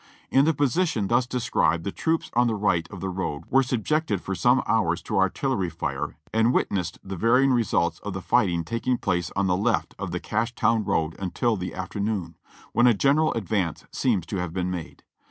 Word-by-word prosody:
In 135 Hz, +1 st, +5 dB
the 160 Hz, -, +3 dB
position 145 Hz, -, +1 dB
thus 120 Hz, +1 st, +2 dB
described, 115 Hz, -10 st, +1 dB
the 100 Hz, -, -3 dB
troops 160 Hz, +8 st, -1 dB
on 120 Hz, +1 st, +3 dB
the 115 Hz, -, 0 dB
right 90 Hz, -5 st, 0 dB
of -, -, -9 dB
the 95 Hz, -, -2 dB
road 85 Hz, -5 st, -3 dB
were 135 Hz, +1 st, +5 dB
subjected 130 Hz, -, 0 dB
for 95 Hz, -, -4 dB
some 125 Hz, +6 st, +3 dB
hours 90 Hz, -7 st, +1 dB
to -, -, -1 dB
artillery 95 Hz, -1 st, 0 dB
lire 70 Hz, -4 st, -3 dB, 0.2 s
and 110 Hz, +2 st, +3 dB
wit -, -, +1 dB
nessed 85 Hz, -4 st, -2 dB
the 95 Hz, 0 st, -6 dB
varying 125 Hz, +7 st, +3 dB
results 100 Hz, -7 st, +1 dB
of -, -, -6 dB
the -, -, -4 dB
fighting 85 Hz, -2 st, +2 dB
taking 115 Hz, +7 st, -1 dB
place 90 Hz, -6 st, -1 dB
on 100 Hz, 0 st, +1 dB
the 90 Hz, -1 st, +2 dB
left 100 Hz, -, 0 dB
of -, -, -3 dB
the -, -, -3 dB
Cashtown 115 Hz, 0 st, 0 dB
road 80 Hz, 0 st, 0 dB
until 110 Hz, +5 st, 0 dB
the 90 Hz, -2 st, -5 dB
afternoon, 100 Hz, -2 st, -3 dB, 0.4 s
when 120 Hz, +1 st, +5 dB
a 120 Hz, -, +5 dB
general 145 Hz, +8 st, +3 dB
advance 100 Hz, -5 st, -2 dB
seems 105 Hz, -10 st, 0 dB
to 95 Hz, -, -4 dB
have 90 Hz, -2 st, -3 dB
been 90 Hz, 0 st, -1 dB
made. 90 Hz, -3 st, -7 dB
105 Hz, 200 wpm, -25 LUFS, 90-125 Hz, 0.4 s, In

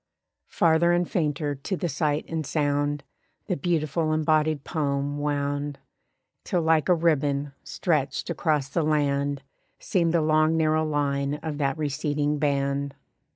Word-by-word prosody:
Farther 170 Hz, +1 st, +3 dB
and 175 Hz, 0 st, +1 dB
fainter 150 Hz, -3 st, -1 dB
to 145 Hz, +7 st, -4 dB
the 175 Hz, -, -1 dB
sight 150 Hz, -1 st, 0 dB
and 160 Hz, -1 st, -2 dB
sound 145 Hz, -1 st, 0 dB, 0.4 s
The 185 Hz, -, -1 dB
beautiful 155 Hz, 0 st, 0 dB
embodied 155 Hz, -1 st, +2 dB
poem 145 Hz, -2 st, -1 dB
wound; 145 Hz, 0 st, -2 dB, 0.7 s
Till 175 Hz, -2 st, 0 dB
like 160 Hz, +1 st, +3 dB
a 180 Hz, -, +6 dB
ribbon, 145 Hz, -4 st, +1 dB
stretched 155 Hz, -1 st, -1 dB
across 150 Hz, -3 st, 0 dB
the 165 Hz, +4 st, -1 dB
land 145 Hz, -2 st, 0 dB, 0.3 s
Seemed 170 Hz, -2 st, 0 dB
the 165 Hz, -, +4 dB
long 155 Hz, +1 st, +3 dB
narrow 155 Hz, 0 st, +2 dB
line 140 Hz, -2 st, 0 dB
of 155 Hz, -2 st, -4 dB
that 135 Hz, -1 st, 0 dB
receding 145 Hz, 0 st, -1 dB
band. 140 Hz, -1 st, 0 dB
150 Hz, 135 wpm, -26 LUFS, 145-160 Hz, 0.7 s, a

